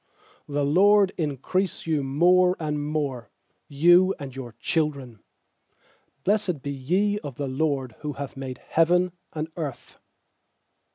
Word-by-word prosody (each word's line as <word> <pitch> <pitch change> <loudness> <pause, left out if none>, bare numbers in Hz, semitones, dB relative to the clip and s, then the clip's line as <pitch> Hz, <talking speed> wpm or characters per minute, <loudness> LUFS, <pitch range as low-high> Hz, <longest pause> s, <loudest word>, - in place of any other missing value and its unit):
I4The 145 0 0
LORD 200 +1 +5
increase 160 +5 -2
you 155 -3 +1
more 180 +7 +4
and 150 -2 -2
more, 145 -6 -3 0.4
You 175 +6 +5
and 135 -3 -8
your 125 -4 -7
children. 140 -3 -2 1.1
lfiBIessed 195 -8 0
be 140 - -3
ye 185 +10 0
of 145 -9 -8
the 140 +1 -3
LORD, 135 -2 -1
Who 150 -2 -5 0.2
made 130 -2 -6
heaven 175 +5 +2 0.2
and 155 0 -4
earth. 145 -6 -6
150 Hz, 120 wpm, -25 LUFS, 135-180 Hz, 1.1 s, LORD